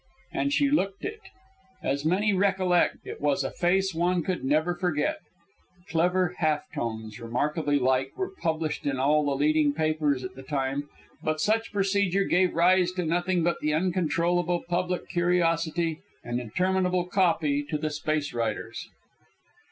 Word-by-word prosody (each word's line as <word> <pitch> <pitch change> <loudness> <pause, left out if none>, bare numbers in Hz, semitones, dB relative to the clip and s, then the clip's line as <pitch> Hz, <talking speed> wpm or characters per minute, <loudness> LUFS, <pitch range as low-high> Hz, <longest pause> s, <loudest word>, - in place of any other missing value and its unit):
And 280 - 0
she 285 -1 +2
looked 200 - 0
it. 435 +2 -4 0.6
As 140 +2 -1
many 200 +5 +2
recollect, 190 -2 +2
it - - -8
was 145 -1 +1
a 135 - -3
face 190 +2 +1
one 175 +1 +1
could 185 +1 -2
never 155 +6 +2
forget. 175 - -1 0.7
Clever 180 +2 +1
half 155 -2 +1
tones, 110 -1 -4
remarkably 145 +6 0
like, 130 0 +1
were 380 -1 -2
published 160 -2 -1
in 140 -2 0
all 150 +3 +3
the 140 -1 0
leading 150 +1 +2
papers 155 -3 0
at 125 0 -6
the 130 - -10
time; 135 +1 -2 0.3
but 155 0 -1
such 225 +6 +1
procedure 195 -1 +1
gave 180 -1 +2
rise 180 +1 +4
to 180 -2 -2
nothing 175 +1 +1
but 170 +1 0
the 150 0 +1
uncontrollable 175 0 +1
public 180 +1 -1
curiosity 170 -2 +1 0.2
and 120 +1 -2
interminable 180 - 0
copy 165 -6 +1
to 155 - 0
the 155 0 -2
space 150 0 -2
writers. 115 -1 -3
165 Hz, 150 wpm, -27 LUFS, 145-185 Hz, 0.7 s, rise